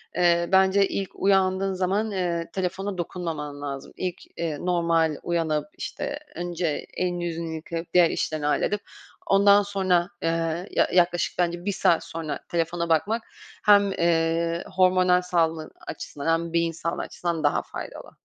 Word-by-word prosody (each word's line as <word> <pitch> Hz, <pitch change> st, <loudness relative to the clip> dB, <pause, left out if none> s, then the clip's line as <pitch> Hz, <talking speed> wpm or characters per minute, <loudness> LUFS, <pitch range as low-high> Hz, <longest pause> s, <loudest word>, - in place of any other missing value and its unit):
eee, 170 Hz, -1 st, +3 dB
bence 190 Hz, +1 st, +5 dB
ilk 195 Hz, -2 st, -3 dB
uyandığın 190 Hz, 0 st, +2 dB
zaman, 195 Hz, +4 st, 0 dB
eee, 175 Hz, -3 st, -2 dB
telefona 190 Hz, +1 st, -2 dB
dokunmaman 160 Hz, -5 st, -4 dB
lazım. 140 Hz, -1 st, -6 dB
İlk, 185 Hz, -1 st, -3 dB, 0.2 s
eee, 165 Hz, -3 st, -2 dB
normal 170 Hz, -3 st, +1 dB
uyanıp, 165 Hz, -3 st, 0 dB
işte, 295 Hz, -3 st, -4 dB, 0.2 s
önce 175 Hz, -3 st, -2 dB
elini, 175 Hz, -1 st, -1 dB
yüzünü 165 Hz, -1 st, -3 dB
yıkayıp 165 Hz, +1 st, -6 dB
diğer 175 Hz, -2 st, +6 dB
işlerini 155 Hz, -2 st, -2 dB
halledip 205 Hz, +7 st, +1 dB, 0.5 s
ondan 200 Hz, +1 st, +6 dB
sonra, 190 Hz, -3 st, +1 dB
eee, 165 Hz, +2 st, -1 dB
ya -, -, +3 dB
yaklaşık 175 Hz, -1 st, +2 dB
bence 175 Hz, 0 st, 0 dB
1 205 Hz, -, +1 dB
saat 170 Hz, -3 st, +2 dB
sonra 155 Hz, -3 st, -5 dB
telefona 170 Hz, 0 st, -1 dB
bakmak, 205 Hz, +9 st, +2 dB, 0.4 s
hem, 200 Hz, -1 st, +6 dB
eee, 170 Hz, -1 st, +1 dB
hormonal 185 Hz, -1 st, +4 dB
sağlığın 165 Hz, -3 st, 0 dB, 0.2 s
açısından 145 Hz, -1 st, -6 dB
hem 165 Hz, 0 st, -2 dB
beyin 170 Hz, 0 st, +2 dB
sağlığı 170 Hz, +1 st, -3 dB
açısından 170 Hz, -3 st, -3 dB
daha 145 Hz, -, +2 dB
faydalı. -, -, -8 dB
175 Hz, 140 wpm, -25 LUFS, 165-185 Hz, 0.5 s, diğer